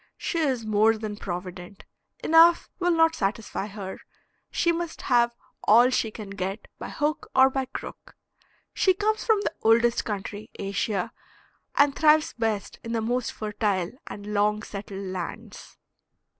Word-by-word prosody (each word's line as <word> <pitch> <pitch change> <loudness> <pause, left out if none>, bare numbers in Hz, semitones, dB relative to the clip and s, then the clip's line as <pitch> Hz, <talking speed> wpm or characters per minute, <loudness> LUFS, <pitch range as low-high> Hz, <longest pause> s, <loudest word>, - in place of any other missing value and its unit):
She 340 - -2
is 260 -7 0
more 215 +1 +3
than 215 -1 -5
provident. 180 0 -7 0.4
Enough 330 +1 +5
will 355 -1 +1
not 325 -1 +4
satisfy 205 -4 -2
her, 195 -2 -7 0.5
she 340 - +2
must 340 -1 -4
have 235 -2 +3 0.3
all 240 +4 +6
she 230 -3 +1
can 210 -2 -9
get 195 +1 -4
by - - -6
hook 300 +1 -2
or 265 0 +6
by 265 0 -1
crook. 260 - -9 0.6
She 375 -1 +3
comes 430 +2 0
from 435 -3 +3
the - - -2
oldest 230 +1 +4
country, 210 0 -5
Asia, 195 -1 -2 0.6
and 285 -1 +4
thrives 310 0 +4
best 220 -3 -2
in 230 - -4
the 225 - 0
most 245 +2 -1
fertile 205 -4 -1 0.2
and 205 0 -7
long 210 +1 +1
settled 200 -1 -7
lands. 185 -1 -7
225 Hz, 145 wpm, -26 LUFS, 205-280 Hz, 0.6 s, all